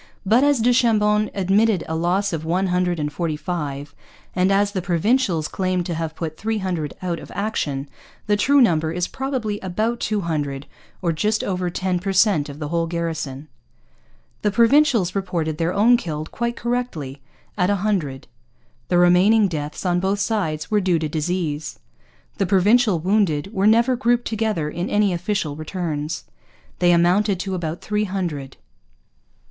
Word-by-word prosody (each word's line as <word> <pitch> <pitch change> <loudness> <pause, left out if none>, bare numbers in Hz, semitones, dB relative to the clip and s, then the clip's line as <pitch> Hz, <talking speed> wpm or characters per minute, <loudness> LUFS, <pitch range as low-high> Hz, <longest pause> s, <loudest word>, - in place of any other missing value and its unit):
But 225 +7 +4
as 285 -4 +3
du 245 +2 +4
Chambon 215 -3 +3
admitted 200 +1 +2
a 160 - -3
loss 180 +4 0
of 160 -1 -3
one 180 +4 0
hundred 180 -2 0
and 150 0 -2
forty 160 -1 -2
five, 145 -3 -4 0.4
and 185 +1 +2
as 200 +1 +2
the 190 -3 -2
Provincials 175 -1 +1
claimed 185 -2 -1
to 175 - -3
have 160 -1 -4
put 155 -2 -5
three 220 +1 -1
hundred 175 -7 -3
out 175 -2 -2
of - - -11
action, 150 -9 -2 0.4
the 210 - +2
true 280 +7 +4
number 160 -8 +3
is 175 +1 -1
probably 255 -6 -3
about 215 +6 -2
two 210 -2 -1
hundred, 145 -5 -3 0.4
or 170 - +2
just 210 +7 0
over 180 -2 -1
ten 180 0 -1
per 195 +2 -2
cent 185 -7 +3
of 140 - -8
the 150 -1 -5
whole 165 0 0
garrison. 160 -4 -4 0.9
The 210 - +2
Provincials 235 - +3
reported 170 -5 -2
their 165 +1 +1
own 225 +6 +4
killed, 155 -7 -5
quite 235 0 -2
correctly, 205 - -3 0.3
at 180 -1 +1
a 205 - +3
hundred. 155 -11 -1 0.6
The 175 - +2
remaining 185 +5 +5
deaths, 150 -1 -5
on 175 -1 +2
both 195 +2 0
sides, 185 -8 -2
were 210 -1 +3
due 180 -3 +2
to 155 -1 -2
disease. 155 -1 -2 0.6
The 195 - +1
Provincial 205 +2 +4
wounded 190 -1 0
were 195 0 +2
never 235 +4 +4
grouped 240 0 +1
together 215 -8 -1
in 175 +5 -4
any 205 -2 +2
official 175 -4 -2
returns. 155 -1 -4 0.6
They 175 -1 +4
amounted 180 +3 +3
to 195 0 -4
about 170 -2 -4
three 210 0 -1
hundred. 170 -9 -4
180 Hz, 165 wpm, -22 LUFS, 160-210 Hz, 0.9 s, remaining